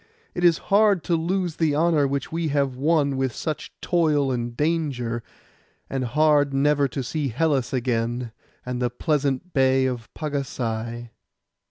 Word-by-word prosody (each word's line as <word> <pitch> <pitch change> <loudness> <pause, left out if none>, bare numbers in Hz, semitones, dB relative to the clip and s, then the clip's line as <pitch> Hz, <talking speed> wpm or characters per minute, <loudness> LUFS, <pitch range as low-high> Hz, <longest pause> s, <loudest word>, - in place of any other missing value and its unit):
It 175 - -3
is 170 -2 +5 0.2
hard 205 -4 +4
to 170 - +1
lose 175 0 -1
the 155 -3 +1
honour 155 -2 +3
which 140 0 -3
we 165 0 -1
have 140 -3 0
won 140 0 +1
with 130 -3 -1
such 155 -2 -4
toil 150 -6 +2
and 120 -1 -3
danger, 140 -7 -1 0.7
and 135 -1 -1
hard 145 +1 +3
never 145 0 +3
to 135 +1 -4
see 145 +3 -2
Hellas 135 0 0
again, 120 -1 -1 0.3
and 125 0 -3
the 125 - +1
pleasant 145 +4 -1
bay 130 -1 +3
of 125 -3 -4
Pagasai. 120 -6 -4
140 Hz, 150 wpm, -24 LUFS, 125-155 Hz, 0.7 s, is